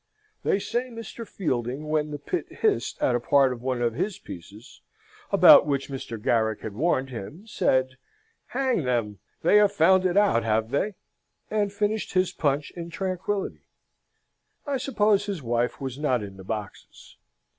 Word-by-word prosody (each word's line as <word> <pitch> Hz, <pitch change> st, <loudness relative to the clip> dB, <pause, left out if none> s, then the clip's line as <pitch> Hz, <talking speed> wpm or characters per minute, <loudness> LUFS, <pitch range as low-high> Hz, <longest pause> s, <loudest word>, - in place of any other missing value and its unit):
They -, -, +2 dB
say 240 Hz, +5 st, -2 dB
Mr. 230 Hz, -1 st, -8 dB
Fielding, 130 Hz, -, -3 dB
when 155 Hz, 0 st, 0 dB
the 145 Hz, -, -4 dB
pit 345 Hz, -, -3 dB
hissed 430 Hz, -3 st, 0 dB
at 125 Hz, -, +3 dB
a 120 Hz, -, +2 dB
part 135 Hz, +1 st, +3 dB
of 120 Hz, -, -10 dB
one 125 Hz, -1 st, -1 dB
of 120 Hz, -1 st, +1 dB
his 185 Hz, -, -2 dB
pieces, 100 Hz, -, -12 dB, 0.5 s
about -, -, +8 dB
which 140 Hz, -1 st, -1 dB
Mr. 130 Hz, -4 st, -6 dB
Garrick 110 Hz, -1 st, +1 dB
had 110 Hz, -, -6 dB
warned 135 Hz, +1 st, 0 dB
him, 135 Hz, -, -8 dB
said, 130 Hz, -11 st, 0 dB, 0.5 s
'Hang 260 Hz, -8 st, 0 dB
them, 115 Hz, -6 st, -1 dB, 0.2 s
they 190 Hz, +5 st, +5 dB
have 205 Hz, -1 st, +5 dB
found 190 Hz, -2 st, +4 dB
it 180 Hz, +2 st, -1 dB
out, 200 Hz, -, +4 dB
have 110 Hz, +1 st, 0 dB
they?' 195 Hz, +8 st, 0 dB, 0.6 s
and 210 Hz, -2 st, +1 dB
finished 210 Hz, +1 st, -1 dB
his 185 Hz, -1 st, +2 dB
punch 145 Hz, -4 st, -1 dB
in 170 Hz, -1 st, -7 dB
tranquillity. 190 Hz, +2 st, -3 dB, 1.0 s
I 285 Hz, -2 st, -1 dB
suppose 210 Hz, -6 st, +1 dB
his 190 Hz, -8 st, -4 dB
wife 120 Hz, +1 st, -1 dB
was 135 Hz, 0 st, -5 dB
not 130 Hz, -7 st, +1 dB
in 100 Hz, -1 st, -9 dB
the 95 Hz, -, -10 dB
boxes. 105 Hz, 0 st, -8 dB
150 Hz, 165 wpm, -26 LUFS, 120-200 Hz, 1.0 s, about